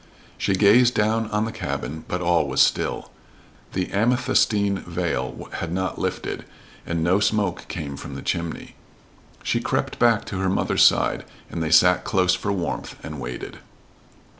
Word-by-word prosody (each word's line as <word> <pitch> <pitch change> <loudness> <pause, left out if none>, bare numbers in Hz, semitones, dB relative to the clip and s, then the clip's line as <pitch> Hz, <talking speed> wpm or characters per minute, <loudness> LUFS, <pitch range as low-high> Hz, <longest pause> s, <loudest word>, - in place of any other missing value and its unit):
She 100 - 0
gazed 115 +5 +5
down 110 +1 +1
on 105 0 0
the 115 - -4
cabin, 80 -6 -5
but 90 - -2
all 85 -3 +2
was 65 - -2
still. - - +2 0.6
The 90 -1 -1
amethystine 105 -3 +2
veil 85 -8 -3
had 85 - -4
not 95 0 -2
lifted, - - -3 0.4
and 85 -1 -1
no 90 +4 +3
smoke 100 -3 0
came 75 -4 -5
from - - -8
the - - -7
chimney. 85 -1 -3 0.7
She - - 0
crept - - -2
back 115 -2 +3
to 95 - -5
her 95 0 +1
mother's 95 - +1
side, - - +3 0.3
and 85 - -4
they 80 - -1
sat 90 +3 +5
close 95 -3 +2
for 100 +2 -1
warmth, 90 -4 -3
and - - -6
waited. - - -6
95 Hz, 160 wpm, -23 LUFS, 85-105 Hz, 0.7 s, gazed